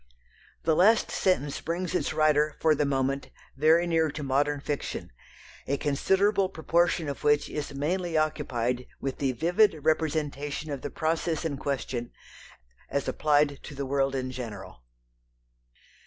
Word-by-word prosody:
The 160 Hz, -1 st, +3 dB
last 215 Hz, +7 st, +4 dB
sentence 150 Hz, -7 st, 0 dB
brings 170 Hz, +2 st, -3 dB
its 180 Hz, -, 0 dB
writer 155 Hz, -1 st, +2 dB
for 160 Hz, -1 st, +4 dB
the 145 Hz, -1 st, +1 dB
moment 135 Hz, 0 st, -1 dB, 0.3 s
very 160 Hz, +5 st, +4 dB
near 165 Hz, -2 st, +2 dB
to 150 Hz, +1 st, -6 dB
modern 145 Hz, +2 st, +1 dB
fiction, 145 Hz, +1 st, -4 dB, 0.6 s
a 140 Hz, -, 0 dB
considerable 190 Hz, +8 st, +2 dB
proportion 170 Hz, -1 st, +1 dB
of 140 Hz, -, -5 dB
which 150 Hz, 0 st, +3 dB
is 145 Hz, -2 st, -4 dB
mainly 170 Hz, +3 st, -1 dB
occupied 125 Hz, -5 st, -1 dB
with 135 Hz, -1 st, -4 dB
the 135 Hz, -2 st, +1 dB
vivid 165 Hz, -, +2 dB
representation 155 Hz, -1 st, -1 dB
of 140 Hz, -2 st, -4 dB
the 145 Hz, -, -4 dB
process 160 Hz, +1 st, -1 dB
in 150 Hz, -3 st, -1 dB
question 130 Hz, -3 st, -3 dB, 0.8 s
as 140 Hz, -, -1 dB
applied 145 Hz, -2 st, +2 dB
to 145 Hz, -, -9 dB
the 140 Hz, 0 st, -3 dB
world 135 Hz, 0 st, 0 dB
in 130 Hz, -1 st, -2 dB
general. 105 Hz, -, -8 dB
150 Hz, 140 wpm, -28 LUFS, 140-160 Hz, 0.8 s, last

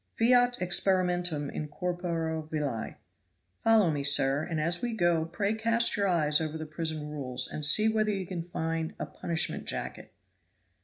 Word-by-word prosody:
'Fiat 245 Hz, +1 st, +3 dB
experimentum 180 Hz, -4 st, +1 dB
in 150 Hz, -, -5 dB
corpore 165 Hz, -1 st, -3 dB
vili.' 145 Hz, -8 st, -3 dB, 0.7 s
Follow 220 Hz, -6 st, +4 dB
me, 145 Hz, -2 st, -3 dB
sir; 140 Hz, 0 st, +3 dB
and 160 Hz, 0 st, -3 dB
as 170 Hz, +3 st, 0 dB
we 240 Hz, -1 st, -2 dB
go 175 Hz, -5 st, +1 dB
pray 200 Hz, +5 st, -2 dB
cast 230 Hz, +1 st, +1 dB
your 200 Hz, -1 st, 0 dB
eyes 155 Hz, -4 st, +2 dB
over 160 Hz, 0 st, -3 dB
the 155 Hz, -, -6 dB
prison 155 Hz, -1 st, -3 dB
rules, 130 Hz, -4 st, +1 dB
and 150 Hz, -, -5 dB
see 210 Hz, +9 st, +6 dB
whether 215 Hz, -1 st, +1 dB
you 195 Hz, -2 st, -3 dB
can 175 Hz, -1 st, -5 dB
find 165 Hz, -1 st, -4 dB
'a -, -, -4 dB
punishment 165 Hz, -1 st, -2 dB
jacket.' -, -, -6 dB
170 Hz, 160 wpm, -28 LUFS, 155-195 Hz, 0.7 s, see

